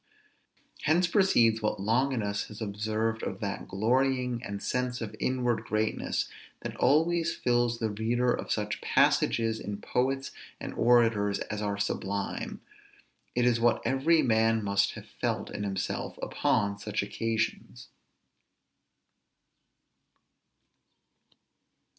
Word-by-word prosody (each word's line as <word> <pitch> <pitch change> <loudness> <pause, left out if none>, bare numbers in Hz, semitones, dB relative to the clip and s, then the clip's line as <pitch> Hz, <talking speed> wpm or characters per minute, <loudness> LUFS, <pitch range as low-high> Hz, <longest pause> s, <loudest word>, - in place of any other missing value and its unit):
Hence 170 +4 +3
proceeds 120 - +3
what 105 - -1
Longinus 110 -1 0
has 105 - -10
observed 110 +1 -2
of - - -4
that - - -4
glorying 125 +3 +1
and 100 -3 -5
sense 125 0 -1
of 110 -2 -5
inward 125 -2 0
greatness, 110 0 -1 0.3
that - - -5
always 165 +4 +3
fills 120 -1 +1
the 110 -2 -1
reader 120 +4 +1
of - - -4
such 105 -1 -1
passages 115 -1 +2
in 100 0 -5
poets 135 +4 -1 0.3
and - - -6
orators 115 -4 +3
as 105 0 -3
are 100 -1 -1
sublime: 100 0 -3 0.7
it 120 0 +2
is 120 -2 +3
what 120 0 +3
every 155 +5 +3
man 110 -1 +3
must 100 0 +2
have - - -9
felt - - -3
in - - -5
himself 95 -2 -3
upon 100 -1 0
such 105 0 -2
occasions. 110 +2 -3
115 Hz, 115 wpm, -29 LUFS, 105-125 Hz, 0.7 s, Hence